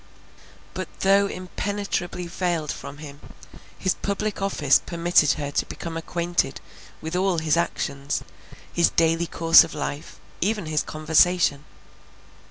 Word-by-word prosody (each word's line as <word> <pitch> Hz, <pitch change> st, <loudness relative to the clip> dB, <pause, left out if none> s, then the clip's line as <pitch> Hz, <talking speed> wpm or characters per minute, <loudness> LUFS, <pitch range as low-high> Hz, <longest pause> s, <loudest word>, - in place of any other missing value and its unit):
But -, -, -4 dB
though 200 Hz, +1 st, +4 dB
impenetrably 185 Hz, -1 st, -3 dB
veiled 170 Hz, -3 st, -2 dB
from 140 Hz, -, -8 dB
him, 145 Hz, -2 st, -10 dB, 0.6 s
his 185 Hz, -, +1 dB
public 200 Hz, 0 st, -3 dB
office 150 Hz, -8 st, +3 dB
permitted 170 Hz, -3 st, +3 dB
her 145 Hz, -2 st, -4 dB
to -, -, 0 dB
become 165 Hz, -1 st, -6 dB
acquainted 170 Hz, -2 st, -1 dB, 0.4 s
with 160 Hz, +2 st, -4 dB
all 185 Hz, -1 st, +1 dB
his 160 Hz, -2 st, +1 dB
actions, 140 Hz, -4 st, -2 dB, 0.5 s
his 170 Hz, -, +4 dB
daily 165 Hz, +1 st, +2 dB
course 165 Hz, 0 st, +6 dB
of -, -, -8 dB
life, 145 Hz, +1 st, -5 dB, 0.2 s
even 205 Hz, 0 st, 0 dB
his 155 Hz, -1 st, 0 dB
conversation. 155 Hz, -1 st, +2 dB
170 Hz, 125 wpm, -24 LUFS, 155-180 Hz, 0.6 s, course